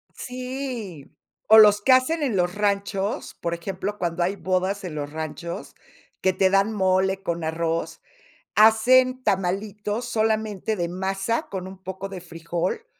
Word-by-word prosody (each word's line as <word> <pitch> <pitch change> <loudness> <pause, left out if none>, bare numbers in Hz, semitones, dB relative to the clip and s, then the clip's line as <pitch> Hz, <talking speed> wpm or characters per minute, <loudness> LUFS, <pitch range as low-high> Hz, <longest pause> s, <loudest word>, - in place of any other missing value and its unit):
Sí, 250 - -6 0.4
o 220 - +8
los 210 -1 +7
que 260 - +3
hacen 295 +5 +2
en 255 -7 0
los 180 -1 0
ranchos, 200 0 -1
por 170 0 -3
ejemplo, 190 +4 -4
cuando 175 -1 -1
hay 190 +3 0
bodas 190 +1 -1
en 175 -4 -6
los 145 -1 -4
ranchos, 160 +2 -6 0.5
que 190 - +2
te 190 +1 +3
dan 195 +3 +2
mole 190 -1 +1
con 170 -1 -2
arroz, 165 +1 -2 0.5
hacen 255 +4 +5
tamalitos 205 +3 -1
solamente 220 -2 -1
de 175 -3 -2
masa 195 +5 -2
con 185 -1 -5
un 190 0 -10
poco 190 +1 -5
de 190 -2 -7
frijol, 170 - -4
195 Hz, 150 wpm, -24 LUFS, 180-220 Hz, 0.5 s, o